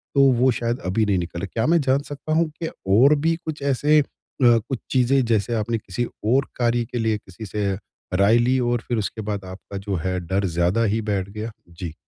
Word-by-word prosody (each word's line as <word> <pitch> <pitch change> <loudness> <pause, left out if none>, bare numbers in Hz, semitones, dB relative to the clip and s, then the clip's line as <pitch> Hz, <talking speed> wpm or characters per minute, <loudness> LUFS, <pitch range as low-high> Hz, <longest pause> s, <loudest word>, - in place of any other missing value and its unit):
तो 140 - +5
वो 125 +2 +3
शायद 120 +1 -2
अभी 105 +4 +1
नहीं 100 -2 +2
निकला। 85 +1 -3
क्या 110 +4 -2
मैं 170 0 +4
जान 135 0 +2
सकता 145 +2 -4
हूँ 160 0 +2
कि 165 - -1 0.3
और 140 +5 +6
भी 165 0 +3
कुछ 155 -2 -5
ऐसे 145 +2 +3
अ, - - -1 0.4
कुछ 120 +1 +3
चीज़ें 130 +1 +3
जैसे 115 0 +1
आपने 115 +1 -1
किसी 110 +2 -3 0.2
और 130 +5 +3
कार्य 120 -1 +1
के 120 - -2
लिए 110 -1 +1
किसी 105 +2 -11
से 105 -1 -1 0.4
राय 100 +5 +4
ली 125 +2 +3
हो 120 -1 +1
और 120 -2 0
फिर 120 - 0
उसके 110 +1 -3
बाद 100 -2 -4
आपका 95 +2 -8
जो 100 0 -3
है 90 +2 -2
डर 95 +3 -1
ज़्यादा 90 +5 +1
ही 110 +1 +1
बैठ 100 -3 -2
गया? 110 +3 -5 0.2
जी। 85 -1 -7
115 Hz, 220 wpm, -23 LUFS, 100-125 Hz, 0.4 s, और